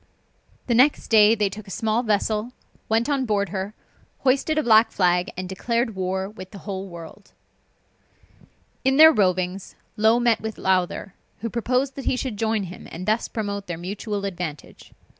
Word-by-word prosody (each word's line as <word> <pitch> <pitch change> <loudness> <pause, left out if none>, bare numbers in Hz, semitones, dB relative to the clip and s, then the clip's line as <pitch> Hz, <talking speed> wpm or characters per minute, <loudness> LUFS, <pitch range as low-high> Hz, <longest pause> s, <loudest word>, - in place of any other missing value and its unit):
The 240 - 0
next 260 +5 +3
day 215 0 +6
they 210 -2 +1
took 200 +1 -8
a - - -10
small 220 +3 0
vessel, 215 +1 -1 0.4
went 225 +3 +2
on 280 -2 0
board 200 -4 0
her, 195 +3 -4 0.5
hoisted 275 +4 +1
a 310 - +2
black 225 -1 +5
flag, 180 -1 +1
and 185 0 -4
declared 230 +5 -1
war 190 0 -2
with 190 -3 -10
the 200 - -11
whole 195 -1 -4
world. 170 +3 -12 1.5
In 265 +1 +2
their 315 +1 +10
rovings, 185 -2 0 0.2
Low 220 +2 +4
met 240 -2 +2
with 220 0 -5
Lowther, 185 0 0 0.3
who 230 -1 -3
proposed 250 +3 0
that 275 - -8
he - - +1
should 255 -4 -3
join 220 -1 0
him, 180 0 -9
and 180 +3 -6
thus 215 +3 +1
promote 200 -2 -4
their 175 -2 -4
mutual 200 +3 -4
advantage. 175 -6 -7
210 Hz, 170 wpm, -23 LUFS, 190-235 Hz, 1.5 s, their